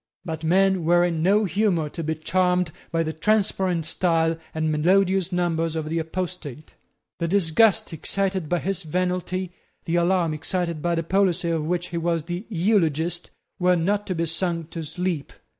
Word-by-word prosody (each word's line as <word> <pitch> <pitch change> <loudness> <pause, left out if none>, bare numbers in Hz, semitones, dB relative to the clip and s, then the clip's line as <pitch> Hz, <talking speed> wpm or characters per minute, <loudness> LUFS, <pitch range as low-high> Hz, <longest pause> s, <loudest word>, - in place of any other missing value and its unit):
But 160 -2 -5
men 190 +2 +3
were 175 +2 +4
in 165 -2 -1
no 205 +5 +3
humour 185 -3 +1
to 165 - -6
be 160 +1 -1
charmed 180 +1 +1 0.2
by 165 -1 +1
the 160 0 -3
transparent 190 -2 +1
style 165 -1 +1 0.2
and 160 0 -1
melodious 190 +4 +2
numbers 165 -2 0
of 160 -1 -3
the 165 +1 0
apostate. 160 -3 -5 0.5
The 170 - 0
disgust 190 +2 +3
excited 190 +1 -1
by 175 -1 +1
his 195 0 -2
venality, 180 +2 -2 0.3
the 170 0 0
alarm 170 -2 +2
excited 170 +1 -2
by 170 +1 0
the 165 - -1
policy 180 -1 +1
of 160 -2 -1
which 175 +2 -1
he 170 - -4
was 165 -1 0
the 175 +5 -5
eulogist, 175 -4 +1 0.3
were 180 0 +4
not 200 +5 0
to 185 - -2
be 165 0 0
sung 165 0 -2
to 165 - -5
sleep. 160 -1 -3
175 Hz, 170 wpm, -24 LUFS, 165-185 Hz, 0.5 s, were